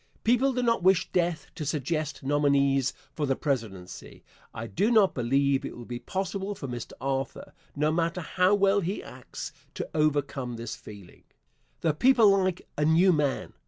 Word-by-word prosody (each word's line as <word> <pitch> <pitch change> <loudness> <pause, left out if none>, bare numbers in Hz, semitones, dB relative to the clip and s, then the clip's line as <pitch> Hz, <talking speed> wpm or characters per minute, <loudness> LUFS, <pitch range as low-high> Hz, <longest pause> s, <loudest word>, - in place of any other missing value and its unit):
People 250 +4 +3
do 250 -1 -1
not 230 -3 +2
wish 185 0 +3
death 170 -2 0
to 165 - -6
suggest 150 +1 -2
nominees 140 -1 +2 0.2
for 150 -2 -2
the 135 - +1
presidency. 110 - -4 0.3
I 110 - -6
do 195 - 0
not 215 -5 +4
believe 135 +2 +1
it - - -6
will 120 - -9
be 120 0 -5
possible 195 +7 -3
for 140 - -6
Mr. 120 -2 -6
Arthur, 135 -1 -3 0.2
no 150 +2 +1
matter 170 +2 0
how 185 +4 +2
well 200 0 +3
he 185 +3 -3
acts, - - -8 0.2
to - - -4
overcome 145 -5 0
this 115 -1 -5
feeling. 100 -4 -13 0.6
The 160 -2 +2
people 230 - +5
like 185 -2 -1
a - - +2
new 170 +4 +5
man. 145 -3 -1
150 Hz, 165 wpm, -27 LUFS, 135-185 Hz, 0.6 s, people